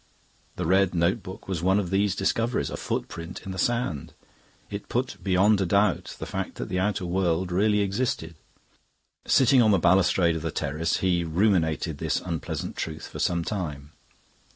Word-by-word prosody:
The -, -, -3 dB
red 95 Hz, +1 st, +3 dB
notebook 95 Hz, +3 st, -1 dB
was 95 Hz, -4 st, -2 dB
one 95 Hz, +2 st, +3 dB
of 95 Hz, -3 st, -3 dB
these 100 Hz, 0 st, +2 dB
discoveries, 115 Hz, +5 st, 0 dB
a -, -, -3 dB
footprint 85 Hz, +1 st, -5 dB
in 95 Hz, -, -5 dB
the 95 Hz, -, -5 dB
sand. 120 Hz, -, -1 dB, 0.6 s
It 100 Hz, 0 st, -6 dB
put 125 Hz, +1 st, -1 dB
beyond 100 Hz, +2 st, +3 dB
a -, -, +2 dB
doubt 100 Hz, +1 st, +1 dB
the -, -, -5 dB
fact -, -, -4 dB
that -, -, -5 dB
the 90 Hz, -, -1 dB
outer 100 Hz, 0 st, 0 dB
world 90 Hz, 0 st, 0 dB
really 105 Hz, +3 st, +2 dB
existed. 100 Hz, -5 st, -1 dB, 0.9 s
Sitting 130 Hz, -1 st, +5 dB
on 110 Hz, -, +4 dB
the 100 Hz, -, +5 dB
balustrade 90 Hz, -1 st, +3 dB
of 80 Hz, -, -3 dB
the 80 Hz, -, -2 dB
terrace, 75 Hz, +2 st, -1 dB
he 90 Hz, -2 st, +2 dB
ruminated 80 Hz, -3 st, +1 dB
this -, -, 0 dB
unpleasant 85 Hz, -4 st, -4 dB
truth 80 Hz, -1 st, -4 dB
for -, -, -8 dB
some 85 Hz, -1 st, +1 dB
time. 75 Hz, -8 st, -4 dB
95 Hz, 170 wpm, -26 LUFS, 85-100 Hz, 0.9 s, Sitting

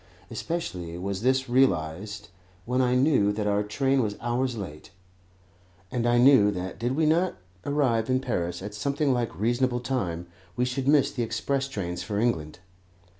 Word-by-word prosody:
Especially 105 Hz, -, -4 dB
was 95 Hz, +2 st, -3 dB
this 130 Hz, +2 st, +2 dB
realized 105 Hz, -4 st, 0 dB, 0.4 s
when 125 Hz, +2 st, +1 dB
I 125 Hz, 0 st, +2 dB
knew 125 Hz, -6 st, +3 dB
that 105 Hz, 0 st, -2 dB
our 105 Hz, 0 st, +2 dB
train 135 Hz, +6 st, +1 dB
was 105 Hz, -3 st, -2 dB
hours 120 Hz, +1 st, -1 dB
late, 75 Hz, -7 st, -7 dB, 1.0 s
and 120 Hz, -2 st, 0 dB
I 120 Hz, 0 st, +4 dB
knew 120 Hz, -5 st, +6 dB
that 95 Hz, -2 st, -4 dB
did 120 Hz, +3 st, -1 dB
we 160 Hz, +1 st, +2 dB
not 170 Hz, +4 st, +2 dB, 0.3 s
arrive 130 Hz, -6 st, +1 dB
in 130 Hz, 0 st, +3 dB
Paris 90 Hz, -9 st, -3 dB
at 105 Hz, +1 st, -6 dB
something 140 Hz, +6 st, 0 dB
like 120 Hz, -9 st, -2 dB
reasonable 120 Hz, +3 st, +1 dB
time, 95 Hz, -10 st, -2 dB, 0.3 s
we 125 Hz, +1 st, +1 dB
should 130 Hz, +1 st, -2 dB
miss 145 Hz, -1 st, +4 dB
the 125 Hz, -, -3 dB
express 135 Hz, +4 st, -1 dB
trains 90 Hz, -9 st, -4 dB
for 105 Hz, -2 st, -3 dB
England. 80 Hz, -10 st, -1 dB
120 Hz, 165 wpm, -26 LUFS, 100-130 Hz, 1.0 s, knew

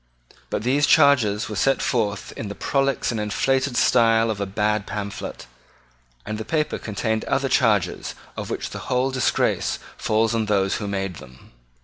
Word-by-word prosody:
But -, -, -2 dB
these 140 Hz, +4 st, +2 dB
charges 130 Hz, -9 st, +4 dB
were 105 Hz, -, -5 dB
set 135 Hz, +6 st, +2 dB
forth 105 Hz, -5 st, -1 dB
in 110 Hz, -, -5 dB
the 100 Hz, -, -6 dB
prolix 135 Hz, -2 st, 0 dB
and 115 Hz, -, -3 dB
inflated 130 Hz, +5 st, 0 dB
style 115 Hz, -2 st, +4 dB
of 100 Hz, -2 st, -4 dB
a 100 Hz, -, -1 dB
bad 105 Hz, +1 st, 0 dB
pamphlet; 100 Hz, -10 st, -5 dB, 0.8 s
and 110 Hz, +1 st, -4 dB
the -, -, -3 dB
paper 150 Hz, +6 st, -1 dB
contained 110 Hz, +1 st, -2 dB
other 135 Hz, 0 st, 0 dB
charges 105 Hz, -8 st, +1 dB, 0.2 s
of -, -, -5 dB
which -, -, -4 dB
the -, -, -6 dB
whole 130 Hz, +1 st, +1 dB
disgrace 130 Hz, -1 st, +1 dB, 0.2 s
falls 110 Hz, +1 st, +1 dB
on 110 Hz, -2 st, 0 dB
those 100 Hz, -2 st, +1 dB
who 105 Hz, -, -4 dB
made 95 Hz, -3 st, -3 dB
them. 65 Hz, -2 st, -15 dB
110 Hz, 165 wpm, -23 LUFS, 100-130 Hz, 0.8 s, charges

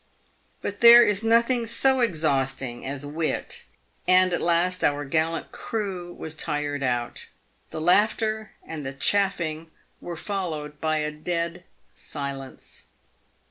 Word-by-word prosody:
But 205 Hz, -, -4 dB
there 235 Hz, +1 st, +10 dB
is 205 Hz, -1 st, +1 dB
nothing 235 Hz, +1 st, +3 dB
so 265 Hz, +3 st, +3 dB
exhausting 135 Hz, -, 0 dB
as 140 Hz, +1 st, -4 dB
wit, 165 Hz, -, -3 dB, 0.4 s
and 185 Hz, 0 st, +5 dB
at -, -, 0 dB
last 175 Hz, +2 st, +1 dB
our 145 Hz, 0 st, +1 dB
gallant 160 Hz, +3 st, -1 dB
crew 190 Hz, -5 st, -4 dB
was 160 Hz, -2 st, -7 dB
tired 145 Hz, -1 st, -2 dB
out. 120 Hz, -2 st, -2 dB, 0.4 s
The -, -, -6 dB
laughter 215 Hz, +4 st, +2 dB
and 160 Hz, -2 st, -6 dB
the 135 Hz, 0 st, -5 dB
"chaffing" 165 Hz, -1 st, 0 dB, 0.3 s
were 175 Hz, -1 st, -6 dB
followed 155 Hz, -7 st, -4 dB
by 155 Hz, -1 st, +1 dB
a 150 Hz, 0 st, -1 dB
dead 170 Hz, +3 st, -3 dB, 0.3 s
silence. 140 Hz, -2 st, -7 dB
170 Hz, 125 wpm, -25 LUFS, 150-205 Hz, 0.4 s, there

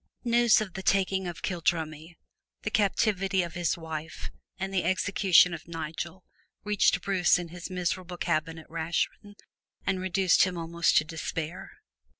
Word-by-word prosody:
News 235 Hz, -2 st, +4 dB
of 195 Hz, -4 st, -5 dB
the 190 Hz, -, -5 dB
taking 190 Hz, -1 st, +1 dB
of 175 Hz, -, -7 dB
Kildrummie, 165 Hz, -2 st, -2 dB, 0.5 s
the -, -, -2 dB
captivity 195 Hz, -2 st, +1 dB
of 170 Hz, -2 st, -6 dB
his 175 Hz, 0 st, 0 dB
wife 160 Hz, -1 st, -6 dB, 0.3 s
and 195 Hz, 0 st, -4 dB
the 185 Hz, -, +1 dB
execution 185 Hz, 0 st, +4 dB
of 165 Hz, -1 st, -8 dB
Nigel 165 Hz, +2 st, -6 dB, 0.4 s
reached 210 Hz, -1 st, +2 dB
Bruce 190 Hz, -3 st, +3 dB
in 175 Hz, -1 st, -5 dB
his 175 Hz, +2 st, -8 dB
miserable 180 Hz, 0 st, -3 dB
cabin 160 Hz, 0 st, -1 dB
at 160 Hz, -, -12 dB
Rachrin 165 Hz, +5 st, -3 dB, 0.5 s
and 185 Hz, -1 st, 0 dB
reduced 185 Hz, 0 st, +3 dB
him 185 Hz, -2 st, +2 dB
almost 170 Hz, 0 st, +1 dB
to -, -, +5 dB
despair. 160 Hz, +2 st, -5 dB
175 Hz, 150 wpm, -28 LUFS, 165-190 Hz, 0.5 s, to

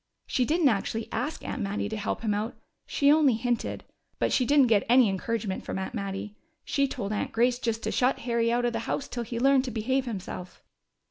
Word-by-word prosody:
She 250 Hz, -, +1 dB
didn't 315 Hz, +1 st, +3 dB
actually 220 Hz, +1 st, -1 dB
ask 255 Hz, +7 st, -3 dB
Aunt 265 Hz, -, -3 dB
Mattie 205 Hz, 0 st, -2 dB
to 220 Hz, -, -4 dB
help 210 Hz, 0 st, -3 dB
him 215 Hz, -2 st, 0 dB
out: 210 Hz, +3 st, -2 dB, 0.3 s
she 280 Hz, 0 st, +3 dB
only 295 Hz, -5 st, +5 dB
hinted. 240 Hz, +1 st, -2 dB, 0.3 s
But -, -, 0 dB
she 250 Hz, -, +2 dB
didn't 285 Hz, -2 st, +6 dB
get 220 Hz, -4 st, +3 dB
any 250 Hz, -1 st, +6 dB
encouragement 200 Hz, 0 st, -2 dB
from -, -, -4 dB
Aunt 190 Hz, -, -4 dB
Mattie. 200 Hz, +1 st, -4 dB, 0.3 s
She 280 Hz, -1 st, +1 dB
told 205 Hz, -5 st, -4 dB
Aunt 210 Hz, -, -2 dB
Grace 245 Hz, +2 st, +2 dB
just 230 Hz, -2 st, -2 dB
to -, -, -1 dB
shut 255 Hz, +1 st, +2 dB
Harry 235 Hz, -1 st, +1 dB
out 240 Hz, +1 st, +1 dB
of 240 Hz, -, 0 dB
the 230 Hz, -, -1 dB
house 280 Hz, -, -1 dB
till 240 Hz, -, -4 dB
he 235 Hz, 0 st, -4 dB
learned 270 Hz, +1 st, +4 dB
to -, -, -3 dB
behave 255 Hz, +4 st, 0 dB
himself!" 190 Hz, -5 st, -7 dB
235 Hz, 215 wpm, -27 LUFS, 210-255 Hz, 0.3 s, didn't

